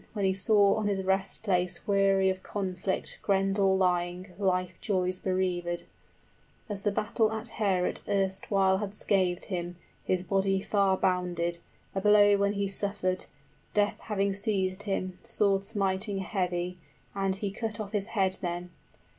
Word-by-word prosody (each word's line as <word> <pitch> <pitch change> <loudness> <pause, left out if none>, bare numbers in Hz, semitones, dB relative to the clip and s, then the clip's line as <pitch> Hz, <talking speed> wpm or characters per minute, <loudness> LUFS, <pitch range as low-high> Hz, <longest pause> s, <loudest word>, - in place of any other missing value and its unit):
} - - -32
When 205 -3 -1
he 190 - +3
saw 200 +1 +4
on 215 -1 0
his 195 -2 0
rest 190 +2 0
place 180 -3 0
weary 195 -1 +3
of 185 0 -6
conflict 190 -1 -3
Grendel 195 -1 +2
lying, 180 0 0
of 180 - -20
life 185 -2 +1
joys 185 -3 0
bereavèd, 180 -2 -1
30 - - -21 0.8
As 200 -2 -4
the 205 - +1
battle 215 +1 +1
at 220 +1 -4
Heorot 190 -4 +1
erstwhile 190 0 +2
had 205 -1 -4
scathed 185 -4 +1
him; 175 -2 -4 0.3
His 185 -1 0
body 195 0 +1
far 195 -1 +2
bounded, 175 -2 0 0.3
a 195 - -1
blow 205 0 +6
when 200 0 +1
he 200 -1 -1
suffered, 195 -2 -2 0.5
Death 205 0 +2
having 200 -2 -1
seized 195 -1 -1
him, 185 -1 -2
sword 200 -4 +1
smiting 195 -1 0
heavy, 180 -2 -2 0.3
And 195 -1 0
he 200 0 -3
cut 220 +1 -4
off 205 -2 -5
his 205 -1 -1
head 190 -4 0
then. 175 -1 -4
195 Hz, 155 wpm, -29 LUFS, 185-200 Hz, 0.8 s, blow